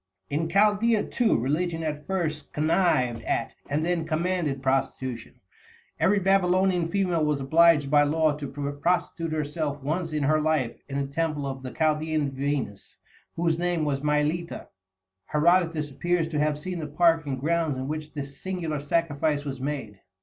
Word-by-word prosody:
In 155 +3 0
Chaldæa, 210 +4 +2
too, 240 -3 +2
religion 165 +7 -1
at 150 -1 -4
first 160 -6 -2
connived 150 -7 +2
at, 115 - -2 0.2
and 150 +3 0
then 170 -2 -1
commanded 160 -4 -1
prostitution. 130 -3 -2 0.6
Every 205 +2 +3
Babylonian 185 -2 +2
female 180 -3 0
was 150 -2 +1
obliged 150 0 +4
by 145 -1 +6
law 155 +1 +2
to 145 -1 -5
prostitute 145 +4 -1
herself 150 -1 -2
once 160 +3 -2
in 150 -1 -1
her 155 +2 +3
life 150 -6 0
in 140 - -3
the 140 - -1
temple 150 0 -2
of 135 -1 -4
the 130 - -6
Chaldæan 155 -1 0
Venus, 135 -6 -3 0.4
whose 165 -1 0
name 175 -3 0
was 140 -2 -1
Mylitta. 150 +3 -1 0.6
Herodotus 165 -1 +2
appears 175 +3 0
to 155 -2 -2
have 150 0 +1
seen 180 +3 -5
the 155 - -4
park 165 0 +3
and 130 -2 -2
grounds 160 -1 0
in 130 +1 -4
which 155 0 -5
this 140 -2 -7
singular 175 -5 -3
sacrifice 145 -1 0
was 135 -2 -5
made. 130 -8 -4
155 Hz, 155 wpm, -26 LUFS, 145-170 Hz, 0.6 s, by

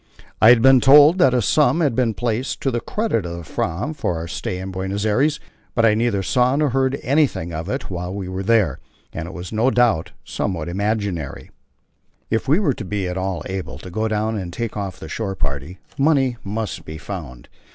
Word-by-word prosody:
I 110 - +8
had 120 -1 +6
been 135 -1 +7
told 150 +6 +7
that 130 -7 +5
a 125 - +2
sum 150 +8 +3
had 145 -7 +2
been 115 -2 +1
placed 120 +2 -2
to 135 - 0
the 120 - -1
credit 210 - -1
of 85 0 -5
the 85 - -7
Fram 85 - -3
for 90 - -2
our 80 +1 -5
stay 90 - -4
in 95 +1 -6
Buenos 95 +2 -3
Aires, 135 +8 +2 0.4
but 115 - +3
I 110 - +5
neither 110 -3 0
saw 125 +5 +2
nor 150 0 +2
heard 135 +1 +1
anything 135 - +1
of 80 +4 -4
it 130 -4 -4
while 90 0 -4
we 95 -1 -5
were 95 +1 -4
there, 100 - +2 0.3
and 80 - -5
it - - -7
was 90 0 -7
no 110 +4 +2
doubt 100 -9 +2
somewhat 85 -4 -3
imaginary. 100 -6 -3 0.8
If 115 +3 0
we 150 +7 +4
were 170 -10 +2
to 115 - -7
be 100 -1 -2
at 90 - -3
all 95 -2 -3
able 95 -8 -5
to 90 +6 -10
go 110 +5 -1
down 110 0 -1
and 90 -2 -6
take 115 +4 -4
off 100 -3 -5
the - - -8
shore 100 -4 -3
party 75 +3 -4 0.2
money 135 -4 +3
must 105 +2 -4
be 80 - -8
found. 80 -9 -8
105 Hz, 215 wpm, -21 LUFS, 90-125 Hz, 0.8 s, I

